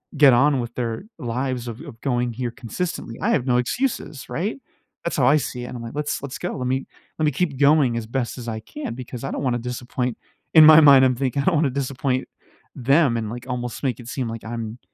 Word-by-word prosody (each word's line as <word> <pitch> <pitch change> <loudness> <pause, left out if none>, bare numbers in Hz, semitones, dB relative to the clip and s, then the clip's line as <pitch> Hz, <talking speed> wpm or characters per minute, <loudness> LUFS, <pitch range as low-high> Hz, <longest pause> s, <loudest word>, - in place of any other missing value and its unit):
get 145 -2 +7
on 140 +2 +4
with 120 0 -7
their 120 - -3
lives 125 0 -3
of 115 0 -7
of 115 - -11
going 125 -3 0
here 120 0 -3
consistently, 120 0 -5
I - - +1
have 130 - +1
no 125 -1 +2
excuses," 155 - -2
right? 175 - -2 0.5
That's 170 - -2
how 130 -3 +4
I 145 - +6
see 125 -2 -4
it - - -6
and - - -7
I'm 115 - -7
like, 115 +4 -8
"Let's 150 -2 -2
let's 130 -2 -5
go. - - -4
Let 125 - -3
me 130 +1 -1 0.3
let 155 - +2
me 150 - +3
keep 145 -2 -1
going 140 -5 +4
as 110 -1 -4
best 125 +1 -3
as 120 -1 -8
I 110 -1 -3
can 300 - -6
because 125 0 -8
I - - -3
don't - - -3
wanna 125 -3 +1
disappoint," 125 0 -3 0.4
in 160 - +9
my 155 0 +10
mind, 140 -3 +8
I'm 130 -1 +2
thinking, 135 +1 -1
"I - - -4
don't 185 - +3
wanna 150 -2 +2
disappoint 135 -1 -2 0.5
them," 135 0 +3
and, 110 -2 -3
like, 120 +2 -7
almost 125 +1 -4
make 125 -4 -1
it 120 - -10
seem 130 -3 -3
like 115 -1 -7
I'm 115 0 -5
125 Hz, 240 wpm, -23 LUFS, 120-140 Hz, 0.5 s, my